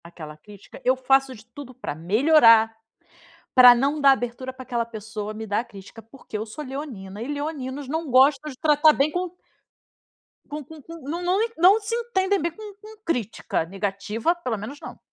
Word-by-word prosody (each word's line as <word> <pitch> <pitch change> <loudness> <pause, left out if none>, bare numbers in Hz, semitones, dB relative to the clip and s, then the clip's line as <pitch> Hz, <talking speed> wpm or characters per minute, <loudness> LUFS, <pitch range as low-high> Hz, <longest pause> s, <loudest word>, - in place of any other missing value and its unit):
Aquela 160 -3 -10
crítica, 200 +6 -15
eu 255 +1 +3
faço 270 0 +1
de 220 -1 -16
tudo 255 +2 -12
pra 255 - -5
melhorar, 225 - +4 0.8
pra 250 -1 +9
não 280 +5 0
dar 275 -1 +7
abertura 255 0 -4
pra 260 0 -11
aquela 240 -2 -2
pessoa 215 -1 -7
me 220 +1 -7
dar 210 +3 -1
crítica, 210 -1 -13
porque 225 -1 -9
eu 215 - -5
sou 295 +8 -8
leonina, 250 -8 -7
e 235 - -5
leoninos 285 -2 -5
não 320 +2 -3
gostam 270 +3 +4
de 260 - -11
tratar 305 +2 +4
bem 290 +1 +1
com 360 +2 -3 1.2
com 300 0 -5
com 320 -1 -11
com, 330 0 -11
não 340 +3 -3
não 360 +2 +1 0.2
não 375 +6 +6
se 425 +2 -5
entendem 405 -5 0
bem 340 +2 -1
com 425 +3 -11
com 435 +1 -13
crítica, 235 - -2
negativa, 205 - -2
pelo 255 -10 -4
menos 225 +8 -8
não. - - -10
260 Hz, 180 wpm, -24 LUFS, 220-305 Hz, 1.2 s, pra